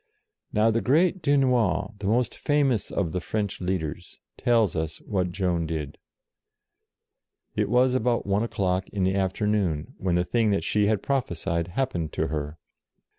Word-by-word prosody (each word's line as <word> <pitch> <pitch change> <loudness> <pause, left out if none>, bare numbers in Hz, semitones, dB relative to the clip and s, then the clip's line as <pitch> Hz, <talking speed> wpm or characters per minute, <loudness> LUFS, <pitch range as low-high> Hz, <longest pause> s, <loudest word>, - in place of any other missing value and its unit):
Now 110 +2 +3
the 115 +1 +1
great 170 +7 +2
Dunois, 125 - +2
the 100 - -3
most 120 +4 +1
famous 140 -7 +1
SAVES - - -11
ORLEANS - - -8
45 - - -2
of 80 - -8
the 90 - -1
French 105 +1 -3
leaders, 90 -2 -3 0.2
tells 115 -6 +2
us 80 -1 -2
what 90 -3 -1
Joan 90 -3 0
did. 75 -3 -4 1.6
It - - 0
was 125 +2 +4
about 125 -2 +1
one 100 +1 +1
o'clock 95 -5 -1
in 100 -2 -2
the 95 +1 +2
afternoon, 95 -4 0
when 90 -2 0
the 90 0 +2
thing 115 +2 +1
that 100 - +1
she 105 -1 +2
had 105 -2 +1
prophesied 85 - -1
happened 90 - -2
to - - -1
her. 75 +1 -4
100 Hz, 170 wpm, -26 LUFS, 90-120 Hz, 1.6 s, was